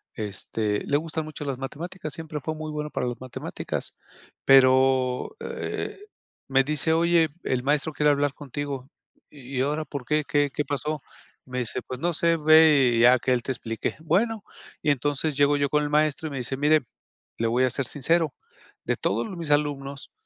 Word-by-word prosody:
este, 105 0 -2
le 140 - 0
gustan 160 0 -4
mucho 155 -1 -7
las 135 -2 -3
matemáticas, 155 +4 -6
siempre 155 -2 -5
fue 155 +3 -3
muy 155 0 -5
bueno 150 0 -4
para 125 - -2
las 120 - -4
matemáticas. 130 -2 -4 0.5
Pero, 130 - +4
eh, 465 - -4 0.5
me 135 0 +4
dice: 150 +3 0
"Oye, 165 -1 +3
el 125 -1 -1
maestro 150 +3 +1
quiere 150 0 +3
hablar 145 -1 +1
contigo". 140 -2 -5 0.4
'¿Y 135 -2 -7
ahora 150 +3 0
por 140 -2 -6
qué? 150 +3 +1
¿Qué 145 -1 +2
qué 150 - -1
pasó'". 150 +1 -2 0.4
Me 130 0 -4
dice: 120 - -1
"Pues 130 0 -7
no 175 +2 0
sé. 165 +1 +2
Ve, 155 -4 +6
y 115 - +2
ya 125 +1 +7
que 130 - +1
él 120 -1 0
te - - -2
explique. 115 -3 -3
'Bueno'". 205 +7 0 0.4
Y 150 - +3
entonces, 145 +2 -1
llego 145 0 +4
yo 145 0 +1
con 150 +1 +2
el 145 - -2
maestro, 150 +1 +1
y 150 - -6
me 135 - -4
dice: 125 +2 -2
"Mire, 150 0 +3 0.5
le 115 - +1
voy 120 +3 +2
a - - +1
ser 135 - -1
sincero. 160 +4 +1 0.5
De - - 0
todos - - 0
mis 165 -3 -5
alumnos, 140 -2 -1
145 Hz, 185 wpm, -25 LUFS, 130-155 Hz, 0.5 s, ya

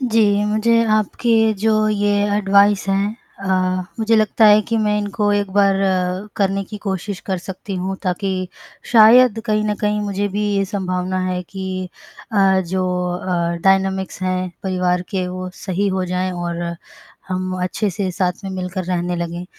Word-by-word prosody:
जी, 215 -4 +2
मुझे 230 +2 +2
आपके 220 +1 +2
जो 215 +1 +2
ये 205 -1 +1 0.3
एडवाइस 200 0 +3
है, 195 +1 +2 0.3
अ, 195 - -5 0.5
मुझे 225 0 +2
लगता 215 +1 +4
है 210 0 +7
कि 230 - 0
मैं 210 -1 +1
इनको 205 0 0
एक 205 -1 0
बार 200 0 +4 0.6
करने 195 -1 +1
की 210 +2 -8
कोशिश 195 0 -3
कर 190 -2 -1
सकती 190 +2 -7
हूँ, 190 +1 -3
ताकि 185 0 -2 0.4
शायद 230 +1 +7
कहीं 215 -1 +1
न 210 0 0
कहीं 210 0 0
मुझे 205 0 -2
भी 205 +2 -2
ये 195 - +2
संभावना 185 -2 -2
है 180 -1 -2
कि 185 0 -5 0.4
अ, 195 -2 +4
जो 185 +2 -1 0.3
अ, 170 -2 -1
डायनामिक्स 190 0 +1
हैं 185 0 -1
परिवार 180 -1 0
के 185 -2 -1
वो 185 0 -5
सही 190 +4 -2
हो 190 -1 -1
जाएँ 180 +1 -1
और 175 -1 -4 0.7
हम 185 0 -3
अच्छे 205 +3 -1
से 190 +1 -2
साथ 180 +2 -2
में 195 - -4
मिलकर 185 0 -4
रहने 175 0 -1
लगें। 170 +1 -4
195 Hz, 160 wpm, -19 LUFS, 185-210 Hz, 0.7 s, है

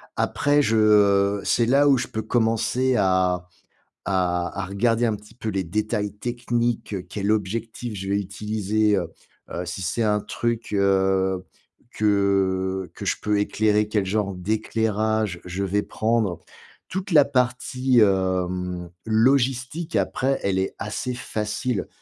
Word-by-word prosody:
Après, 145 0 +2
je, 115 -5 +2
heu 100 -2 +4
c'est 115 - +2
là 140 +4 +4
où 135 - +5
je - - -2
peux 110 - -4
commencer 115 +3 +1
à 95 -2 +2 0.6
à 90 -2 0
à 95 - -3
regarder, 115 +5 +1
un 110 -2 +1
petit 105 +1 -15
peu, 110 -2 -4
les 95 -2 -1
détails 105 +3 -2
techniques: 120 0 -2
quel 105 0 -1
objectif 110 +3 -2
je 95 +1 -5
vais 100 - +1
utiliser, 105 +1 0
heu 90 -3 -1 0.4
heu, 90 +1 -4
si 90 +2 -5
c'est 100 +6 -1
un 105 -1 +2
truc, 115 +1 -3
heu, 95 -1 +2 0.5
que 95 -2 +1
que - - -8
je - - +1
peux 105 -1 +1
éclairer, 105 0 +1
quel 105 -2 0
genre 100 0 -1
d'éclairage, 110 0 -1
je 90 +2 -3
vais 100 +2 0
prendre. 110 -5 0 0.5
Toute 190 +2 -4
la 150 -4 +7
partie, 125 -1 +1
hem, 90 -2 0 0.2
logistique 130 +7 +1
après, 135 +1 0
elle 95 -1 +1
est 95 - -2
assez 110 +4 -3
facile, 110 -1 -3
105 Hz, 140 wpm, -24 LUFS, 95-115 Hz, 0.6 s, la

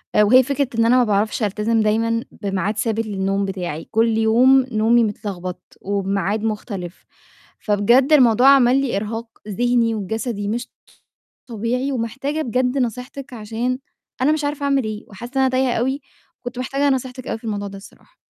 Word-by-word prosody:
آآ 210 - +6
وهي 255 +5 +6
فكرة 280 +1 -1
إن 230 - +4
أنا 245 +2 +4
ما 250 - +5
باعرفش 215 +1 0
ألتَزِم 215 +2 +1
دايمًا 230 +2 +1
بميعاد 200 +1 -3
ثابت 225 0 -1
للنوم 195 -1 -1
بتاعي، 180 -5 -5
كل 225 0 +2
يوم 250 +4 +5
نومي 225 +2 +3
متلغبط 185 -4 -5
وبميعاد 200 +1 -1
مُختلف، 205 -5 -5 0.5
فبجد 225 +6 +3
الموضوع 250 -3 +5
عمل 265 -1 +5
لي 270 -6 -1
إرهاق 225 +3 -4 0.2
ذِهني 235 +2 +1
وجَسدي 215 +1 -3
مش 240 +4 -3 0.8
طبيعي 245 +4 -2
ومحتاجة 275 +5 -3
بجد 250 +2 0
نصيحتِك 250 +2 -4
عشان 230 +3 -3 0.4
أنا 275 +4 +4
مش 310 -1 -1
عارفة 290 0 -3
أعمل 275 -1 +2
إيه 215 -1 -5
وحاسّة 235 +5 -9
إن 270 - +3
أنا 265 - +3
تايهة 255 -1 +1
أوي 265 +4 -1 0.4
كنت 245 0 -6
مِحتاجة 275 +3 0
نصيحتِك 255 0 -7
أوي - - -2
في - - -30
الموضوع 205 -3 -3
ده 195 - -9
الصراحة. 195 - -17
230 Hz, 165 wpm, -20 LUFS, 210-255 Hz, 0.8 s, آآ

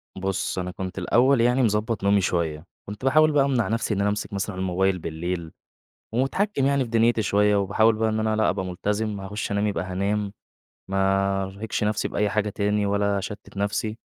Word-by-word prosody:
بُصّ 95 0 -2
أنا 90 0 -3
كنت 95 +1 -6
الأول 120 +7 +3
يعني 125 +2 +3
مضبّط 105 -1 0
نومي 100 0 +4
شوية، 85 -3 -1 0.2
كنت 105 +5 -7
باحاول 155 +3 +5
بقى 140 -2 +3
أمنع 130 -5 +1
نفْسي 115 0 -1
إن 100 - -2
أنا 100 +1 +2
أمسك 105 +1 -3
مثلًا 100 0 -3
الموبايل 95 0 0
بالليل، 85 +1 -4 0.6
ومُتحكم 135 - 0
يعني 140 -1 +2
في 120 - -7
دنيتي 115 0 +3
شوية 105 0 +3
وباحاول 105 +3 +3
بقى 110 0 +1
إن 110 - -1
أنا 110 0 +1
لأ 110 - +2
أبقى 95 -1 -2
ملتزم 105 +3 -2
هاخش 100 +2 -4
أنام 100 +1 +1
يبقى 95 -4 -1
هانام، 100 +2 -2 0.6
ما 95 0 +1
ارهقش 100 +3 -4
نفْسي 105 0 0
بأي 105 0 0
حاجة 105 0 0
تاني، 105 0 0
ولا 100 0 +1
اشتّت 105 +1 -8
نفْسي، 105 +2 -2
105 Hz, 185 wpm, -24 LUFS, 95-110 Hz, 0.6 s, باحاول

